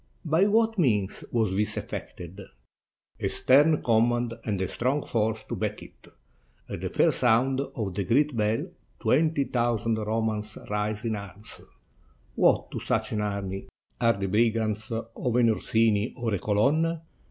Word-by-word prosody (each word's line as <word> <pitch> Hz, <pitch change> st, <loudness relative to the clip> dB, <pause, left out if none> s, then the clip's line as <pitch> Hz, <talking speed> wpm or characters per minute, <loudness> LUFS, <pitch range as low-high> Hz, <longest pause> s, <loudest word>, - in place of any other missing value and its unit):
*'By 165 Hz, +5 st, +3 dB
what 225 Hz, 0 st, +2 dB
means 105 Hz, -, +1 dB
was 110 Hz, -5 st, +1 dB
this 105 Hz, +2 st, -1 dB
effected?" 90 Hz, +3 st, -7 dB, 0.8 s
"A -, -, 0 dB
stern 145 Hz, +4 st, +4 dB
command 120 Hz, +1 st, +2 dB
and 105 Hz, -4 st, -1 dB
a 95 Hz, -, 0 dB
strong 135 Hz, +4 st, -1 dB
force 110 Hz, -1 st, -1 dB
to -, -, -3 dB
back -, -, -3 dB
it. -, -, -16 dB, 0.6 s
At -, -, -6 dB
the -, -, -2 dB
first -, -, +2 dB
sound 125 Hz, +3 st, +3 dB
of 120 Hz, -8 st, -4 dB
the 100 Hz, -, -1 dB
great 145 Hz, +6 st, +2 dB
bell, 110 Hz, 0 st, 0 dB, 0.3 s
twenty 155 Hz, 0 st, +2 dB
thousand 115 Hz, -3 st, 0 dB
Ro 110 Hz, +1 st, -1 dB
mans 110 Hz, -1 st, -3 dB
rise 105 Hz, +1 st, -1 dB
in 110 Hz, -1 st, 0 dB
arms. 100 Hz, +1 st, -9 dB, 0.7 s
What -, -, +2 dB
to -, -, -4 dB
such -, -, -1 dB
an 105 Hz, -, -1 dB
army 100 Hz, -2 st, -3 dB, 0.3 s
are 115 Hz, -1 st, +4 dB
the 100 Hz, -, -1 dB
brigands 110 Hz, +1 st, +1 dB
of 115 Hz, +1 st, -3 dB
an 120 Hz, -2 st, +4 dB
Orsini 110 Hz, 0 st, +1 dB
or 120 Hz, -4 st, -2 dB
a 100 Hz, -, 0 dB
Colonna? 155 Hz, -, +1 dB
115 Hz, 155 wpm, -27 LUFS, 105-130 Hz, 0.8 s, stern